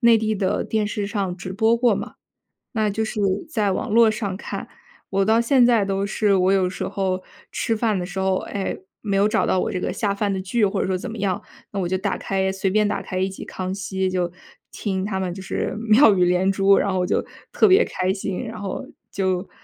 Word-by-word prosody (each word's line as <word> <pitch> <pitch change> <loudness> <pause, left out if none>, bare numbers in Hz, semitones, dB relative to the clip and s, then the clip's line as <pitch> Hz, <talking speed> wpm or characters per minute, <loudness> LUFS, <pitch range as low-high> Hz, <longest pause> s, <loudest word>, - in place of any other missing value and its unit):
内 235 -2 +6
地 220 0 0
的 190 -2 0
电 220 -1 0
视 205 -1 -3
上 195 -3 -2
直 185 +1 -6
播 220 +3 +3
过 240 0 +3
嘛。 - - -5 0.6
那 215 -2 +1
就 215 +2 -1
是 220 - -4 0.3
在 210 -9 +1
网 - - -2
络 225 0 +5
上 205 -4 -3
看， - - -6 0.4
我 195 0 +1
到 220 +2 +4
现 245 +1 +4
在 235 -4 +4
都 195 0 -1
是 200 0 +2
我 185 +1 +3
有 190 -2 +2
时 185 - -4
候 185 -1 -2 0.3
吃 225 - -1
饭 215 -2 +1
的 180 - -2
时 185 +1 -5
候， 190 0 +2
哎， 195 -1 -4 0.2
没 200 -3 -2
有 200 +1 +4
找 215 - +1
到 185 - +2
我 - - -1
这 185 - -2
个 - - -2
下 205 -3 0
饭 200 0 -1
的 190 - -2
剧 205 +4 +1
或 195 0 0
者 - - -1
说 185 -1 0
怎 245 - -6
么 225 - -7
样， 195 -3 -1 0.3
那 200 - -3
我 180 - 0
就 185 +1 0
打 195 0 -2
开 190 0 -1
随 190 0 -1
便 210 +2 +3
打 205 - -2
开 185 -1 -5
一 190 +1 +1
集 190 - -8
《康 185 0 -4
熙》， 190 -1 -2
就 180 -2 0 0.4
听 190 -2 -2
他 200 -2 -2
们 185 -2 -2
就 190 - -8
是 185 - -3 0.2
妙 225 0 +7
语 180 -2 +3
连 180 +2 +2
珠， 195 0 +4
然 200 - +1
后 185 - 0
我 180 - +1
就 - - 0 0.3
特 - - +5
别 385 +5 +6
开 185 +1 -1
心。 195 +1 -4
然 225 -1 -7
后 195 - -4 0.3
就， 185 -1 -1
195 Hz, 260 characters per minute, -23 LUFS, 190-215 Hz, 0.6 s, 妙